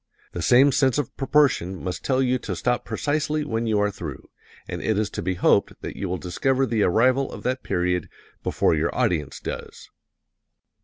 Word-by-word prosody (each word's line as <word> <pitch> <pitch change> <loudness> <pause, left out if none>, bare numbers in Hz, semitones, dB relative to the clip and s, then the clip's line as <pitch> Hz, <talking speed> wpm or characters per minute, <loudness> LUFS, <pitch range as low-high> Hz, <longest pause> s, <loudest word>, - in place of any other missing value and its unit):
The 85 - -5
same 130 +9 +5
sense 130 0 +2
of 145 -5 -3
proportion 135 - +2
must 90 -1 -4
tell 130 -1 +2
you 130 0 +1
to 95 -5 -4
stop 120 +7 0
precisely 150 +1 -1
when 115 -3 -2
you 110 -1 +2
are 105 0 +1
through 80 -7 -8 0.4
and - - -5
it 110 -2 0
is 105 0 0
to - - -4
be 95 +1 -1
hoped - - +2
that - - -5
you 95 - -4
will 90 - -1
discover 130 +10 0
the 115 -4 0
arrival 130 +8 +3
of - - -9
that 130 +1 -1
period 90 -1 -1 0.3
before - - +1
your 80 +1 +1
audience 85 - 0
does. - - -7
115 Hz, 190 wpm, -24 LUFS, 90-130 Hz, 0.4 s, same